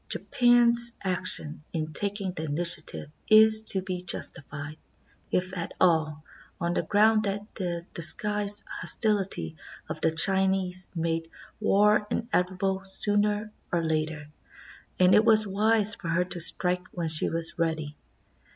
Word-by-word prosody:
Japan's 240 -1 +4
action 180 -5 0
in 155 -1 -4
tak 205 +3 -2
ing 190 -2 -3
the 160 -3 -6
initiative 155 0 0 0.2
is 220 0 +6
to 195 -4 -1
be 185 -1 -5
justified, 150 -3 -5 0.5
if 185 +1 -2
at 170 -2 -5
all, 155 -3 +1 0.4
on 170 -1 -2
the - - 0
ground 215 +1 +2
that 200 0 -3
the 175 -3 -5
disguised 205 +4 +2
hostility 195 - -1 0.3
of - - -7
the 160 - +2
Chinese 190 +2 +1
made 165 0 -3 0.3
war 210 0 +2
in 235 - -2
evitable 190 +1 -1
sooner 205 +2 0 0.2
or 170 -1 -1
later, 155 -1 -3 0.7
and 185 0 +4
it 210 - +5
was 220 -1 +4
wise 210 +1 +1
for 170 - -8
her 170 +2 0
to 180 -1 -1
strike 180 +2 +1
when 170 -2 -4
she 155 -1 +2
was 165 +1 -2
ready. 155 -3 -2
185 Hz, 140 wpm, -26 LUFS, 165-205 Hz, 0.7 s, is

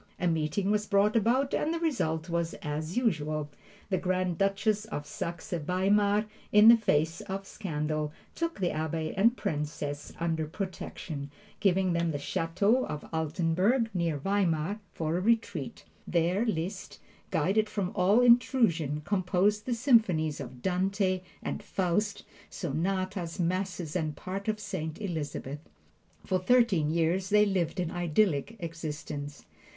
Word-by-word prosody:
A - - -1
meeting 165 +5 0
was 210 0 +1
brought 205 +1 +3
about 245 +5 +2
and 310 - +1
the 335 - -1
result 165 - -1
was 170 -1 -1
as 155 +4 -3
usual. 155 -10 0 0.4
The 185 - +2
Grand 185 -1 -1
Duchess 200 +2 +1
of 150 -9 -5
Saxe 170 +3 -5
Weimar, 200 +5 +2 0.3
in 210 +2 +8
the 235 - +10
face 165 -6 +1
of 195 +1 -3
scandal, 155 -6 -3 0.2
took 335 -7 -3
the 180 -2 +1
Abbe 160 0 -2
and 230 +6 +4
Princess 150 -4 -3
under 165 -2 -1
protection, 160 -5 -5 0.3
giving 190 -2 +2
them 170 0 +1
the 150 - -1
Chateau 200 - +1
of 150 - -5
Altenburg, 175 - +1
near 170 -4 0
Weimar, 190 +2 0
for 160 +1 -1
a - - -1
retreat. 205 - 0 0.2
There 180 +6 +1
Liszt, 175 -2 -3 0.3
guarded 215 +2 +1
from 200 -3 -2
all 200 +6 +4
intrusion, 220 - +3
composed 200 +2 +1
the 245 - +1
symphonies 215 - +3
of 125 -2 -8
"Dante" 185 0 +1 0.2
and - - -3
"Faust," 200 +3 -1 0.3
sonatas, 185 +2 -2
masses 180 -2 -1
and 155 -4 -1
parts 195 +6 -4
of 215 0 -1
"Saint 185 -6 -4
Elizabeth." 150 -7 -4 0.7
For 185 -1 +1
thirteen 190 -6 +3
years 170 +4 +1
they 210 0 +5
lived 190 -2 0
an 175 -2 -1
idyllic 175 +1 +1
existence. 150 -4 -6
180 Hz, 135 wpm, -29 LUFS, 160-205 Hz, 0.7 s, the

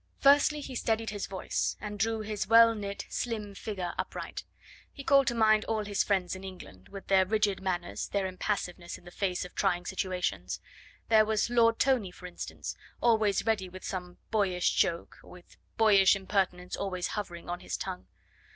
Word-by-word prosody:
Firstly, 290 +2 +5
he 270 - -7
steadied 225 -2 -1
his 205 -2 -4
voice, 190 -1 -2
and 210 -1 -6
drew 225 +1 +1
his 210 -2 -3
well 230 +1 +7
knit, 200 -2 -5
slim 215 -4 -3
figure 190 -4 -4
upright. - - -4 0.5
He 280 - -9
called 275 -1 +5
to 240 - +1
mind 215 -1 +4
all 215 -2 -1
his 205 -1 +1
friends 190 -3 0
in 190 - -9
England, 180 - -10
with 195 -1 -9
their 190 -1 +5
rigid 205 0 +1
manners, 180 -2 -2
their 200 -1 -1
impassiveness 185 -2 -3
in - - -20
the 175 - -11
face 180 -2 -1
of 180 - -11
trying 180 -3 0
situations. 180 - -2 0.5
There 220 -1 +7
was 215 +2 0
Lord 230 -1 +4
Tony, 255 -8 +2
for 180 0 -13
instance, 180 -1 -6 0.2
always 220 -4 +3
ready 210 -5 0
with 185 +1 -11
some 180 -1 -5
boyish 190 -5 +2
joke, 170 0 0
with 180 -1 -15 0.2
boyish 200 -3 +6
impertinence 190 -2 -1
always 185 -3 -2
hovering 175 -5 -5
on 175 0 -3
his - - -4
tongue. 90 +1 -6
200 Hz, 175 wpm, -30 LUFS, 180-220 Hz, 0.5 s, well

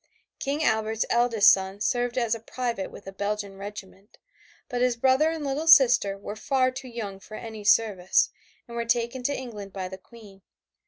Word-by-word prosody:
King 285 +3 -2
Albert's 220 -2 +1
eldest 235 -3 +5
son 190 +1 -1
served 245 +2 -1
as 235 -3 +1
a 230 - -3
private 230 -3 -4
with - - -13
a 195 - -7
Belgian 200 0 -3
regiment, 200 0 -10 0.5
but 245 -2 -3
his 250 -1 +2
brother 265 +5 +3
and 325 -2 -4
little 285 +4 -2
sister 245 -10 +6
were 200 +1 -7 0.4
too 255 0 -8
young 215 -5 -6
for 215 +2 -10
any 220 -2 -8
service 205 -3 +3 0.4
and 235 - -9
were 235 - -1
taken 235 +2 -1
to 280 +3 -1
England 210 -6 -8
by 190 -2 -4
the 190 +1 -9
Queen. 205 -2 -16
225 Hz, 175 wpm, -26 LUFS, 200-245 Hz, 0.5 s, sister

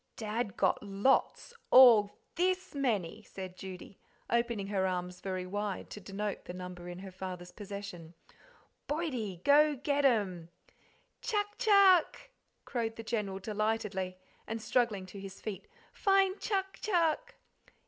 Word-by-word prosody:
"Dad 215 -2 -3
got - - +2
lots 205 - +1 0.2
all 230 -6 +8 0.2
THIS 370 +1 0
many," 220 - -1
said 190 -3 -8
Judy, 185 0 -9 0.3
opening 235 -3 +1
her 190 -2 +1
arms 180 -1 -3
very 185 -1 -3
wide 205 +1 -4
to - - -7
denote 200 +2 -4
the 175 - -7
number 180 -1 -7
in 175 - -7
her 190 +1 -8
father's 180 -1 -7
possession. 200 -5 -8 0.7
"Boydie, 250 - -3
go 295 +1 +5
get 285 +2 0
them!" 200 -11 +1 0.7
"Chuck 415 -2 -1
chuck," 400 +2 +5 0.3
crowed 230 -3 -2
the 225 - -7
General 210 -4 -2
delightedly, 205 -2 -2 0.3
and 225 +1 -3
struggling 220 -3 0
to 185 +2 -10
his 195 0 -9
feet 215 - -6 0.2
"find 390 -1 +2
chuck 385 -2 -2
chuck." 365 +5 +1
210 Hz, 130 wpm, -32 LUFS, 190-285 Hz, 0.7 s, all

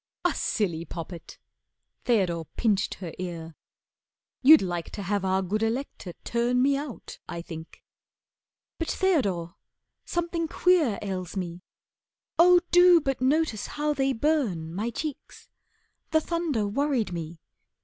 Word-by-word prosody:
"A 355 - +3
silly 170 -7 -1
poppet!" 170 +1 -8 0.7
Theodore 180 -8 +1
pinched 210 -4 +1
her 175 -4 -7
ear. 165 -3 -6 0.9
"You'd 300 0 +8
like 175 -3 -3
to 205 - -5
have 200 +1 -1
our 190 0 +1
good 210 +4 -1
Elector 225 -5 -3
turn 240 +1 +1
Me 275 +2 +4
out 280 -3 -7
I 170 -1 -5
think." 160 -1 -10 1.0
"But, 330 - -2
Theodore, 200 - 0 0.5
something 340 -1 -2
queer 325 - +3
Ails 185 -2 -4
me. 175 -1 -4 0.8
Oh, 355 +1 +7
do 355 -1 +7
but 270 -4 -2
notice 275 -4 +1
how 300 0 -1
they 270 -1 +1
burn, 225 - 0
My 210 +6 -2
cheeks! 290 +5 -7 0.6
The 315 - +4
thunder 320 -10 -1
worried 250 -3 0
me. 165 -1 -6
225 Hz, 130 wpm, -27 LUFS, 180-295 Hz, 1.0 s, You'd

